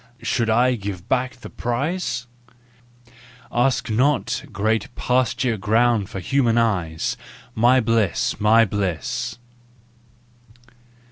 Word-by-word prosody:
" 120 Hz, -, -31 dB
Should 115 Hz, -3 st, 0 dB
I 125 Hz, +3 st, +3 dB
give 100 Hz, -4 st, -6 dB
back 130 Hz, 0 st, 0 dB
the 125 Hz, -, -11 dB
prize? 135 Hz, +4 st, -2 dB, 0.6 s
" 120 Hz, 0 st, -24 dB
Ask 120 Hz, -1 st, +1 dB
not, 135 Hz, +6 st, +1 dB
great 110 Hz, 0 st, 0 dB
pasture 125 Hz, -1 st, 0 dB
ground 110 Hz, +1 st, +2 dB
for 95 Hz, -, -6 dB
human 120 Hz, +4 st, +1 dB
eyes! 90 Hz, -9 st, 0 dB, 0.4 s
My 120 Hz, +3 st, +4 dB
bliss! 110 Hz, -5 st, 0 dB
My 110 Hz, +2 st, +5 dB
bliss! 105 Hz, +6 st, -3 dB
115 Hz, 110 wpm, -22 LUFS, 105-125 Hz, 0.6 s, My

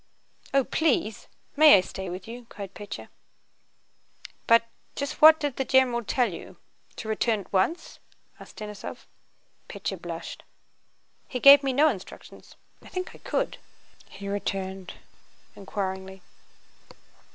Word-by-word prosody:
"Oh, 275 Hz, -1 st, +3 dB
please... 260 Hz, -6 st, 0 dB, 0.3 s
May 300 Hz, -5 st, +8 dB
I -, -, +3 dB
stay 190 Hz, 0 st, -7 dB
with 185 Hz, +3 st, -7 dB
you?" 235 Hz, +1 st, -9 dB
cried 200 Hz, -2 st, -8 dB
Pétya. 205 Hz, -1 st, -8 dB, 1.4 s
"But, 230 Hz, 0 st, +6 dB, 0.3 s
just 280 Hz, +1 st, -4 dB
what 315 Hz, +1 st, +9 dB
did 290 Hz, -3 st, -3 dB
the 265 Hz, -, 0 dB
genewal 255 Hz, -3 st, +3 dB
tell 245 Hz, -7 st, +1 dB
you? -, -, -10 dB, 0.4 s
To -, -, -7 dB
weturn 220 Hz, 0 st, 0 dB
at 195 Hz, -, -17 dB
once?" 195 Hz, -, 0 dB, 0.4 s
asked -, -, -14 dB
Denísov. 210 Hz, -2 st, -8 dB, 0.6 s
Pétya -, -, -5 dB
blushed. -, -, -7 dB, 0.9 s
"He 250 Hz, -, -4 dB
gave 280 Hz, +2 st, +9 dB
me 270 Hz, -1 st, 0 dB
no 290 Hz, +4 st, +4 dB
instructions. 200 Hz, -11 st, -7 dB, 0.3 s
I -, -, -15 dB
think 365 Hz, 0 st, -5 dB
I -, -, -15 dB
could?" -, -, -2 dB, 0.5 s
he 200 Hz, +1 st, -9 dB
returned, 195 Hz, -2 st, -4 dB, 0.6 s
inquiringly. 190 Hz, -1 st, -5 dB
225 Hz, 130 wpm, -26 LUFS, 195-275 Hz, 1.4 s, what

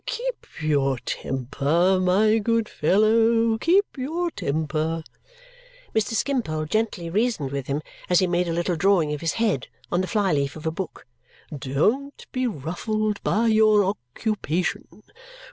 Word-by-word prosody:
"Keep -, -, -4 dB
your 140 Hz, -4 st, +1 dB
temper, 140 Hz, +9 st, 0 dB
my 210 Hz, +5 st, +3 dB
good 230 Hz, +1 st, +1 dB
fellow, 225 Hz, +5 st, +3 dB
keep 380 Hz, -, +4 dB
your 325 Hz, +6 st, -2 dB
temper!" 155 Hz, -, -2 dB, 0.9 s
Mr. 220 Hz, +1 st, 0 dB
Skimpole 225 Hz, -, -1 dB
gently 210 Hz, -1 st, -1 dB
reasoned 195 Hz, -, 0 dB
with 140 Hz, -2 st, -4 dB
him 145 Hz, +2 st, -2 dB, 0.3 s
as 180 Hz, -, +4 dB
he 185 Hz, -, +4 dB
made 175 Hz, 0 st, 0 dB
a -, -, -1 dB
little 175 Hz, +1 st, 0 dB
drawing 165 Hz, -3 st, +2 dB
of 150 Hz, -, -5 dB
his 165 Hz, -, 0 dB
head 210 Hz, -, 0 dB, 0.2 s
on 175 Hz, -, +2 dB
the 185 Hz, -, -2 dB
fly 205 Hz, -4 st, +1 dB
leaf 140 Hz, -1 st, 0 dB
of 155 Hz, 0 st, -9 dB
a 160 Hz, -, +1 dB
book. 180 Hz, +2 st, -6 dB, 0.5 s
"Don't 210 Hz, -, -1 dB
be 255 Hz, -1 st, 0 dB
ruffled 210 Hz, -, -2 dB
by 225 Hz, +3 st, +1 dB
your 215 Hz, -2 st, +5 dB
occupation. 185 Hz, -, -3 dB
185 Hz, 145 wpm, -24 LUFS, 155-225 Hz, 0.9 s, your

